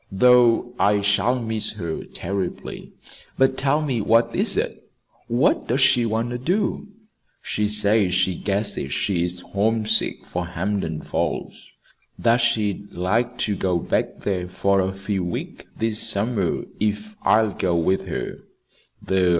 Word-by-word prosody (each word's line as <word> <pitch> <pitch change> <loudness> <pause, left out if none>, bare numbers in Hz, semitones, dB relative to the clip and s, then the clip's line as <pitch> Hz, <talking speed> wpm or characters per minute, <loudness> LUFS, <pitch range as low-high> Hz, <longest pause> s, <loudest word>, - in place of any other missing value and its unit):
Though 120 +2 +4
I 105 0 +3
shall 105 +5 +2
miss 110 -2 -2
her 85 -6 -4
terribly. 95 0 -5 0.5
But, 130 0 +3
tell 140 +3 +1
me, 130 -6 -1
what 115 +2 +3
is - - +2
it - - -3 0.4
what - - +2
does - - +1
she 120 -1 +4
want 115 +2 -1
to 120 - -3
do?" 190 - -1 0.6
"She 105 0 -1
says 105 -2 +3
she 90 0 +2
guesses 100 -8 -2
she 90 +2 0
is 90 +1 -2
homesick 110 +3 0
for 90 0 -4
Hampden 90 -2 -2
Falls; - - -3 0.5
that 115 0 +3
she'd 110 -4 0
like 115 +8 -1
to 105 - -1
go 90 -2 0
back 85 - -2
there 90 -3 -2
for 100 +2 +1
a 95 0 +1
few 95 0 -3
weeks 90 -1 -5
this 110 -1 0
summer 100 -3 0 0.2
if 110 - -2
I'll 110 -1 +3
go 90 -2 0
with 85 +3 +1
her. - - -4
105 Hz, 140 wpm, -23 LUFS, 95-115 Hz, 0.6 s, Though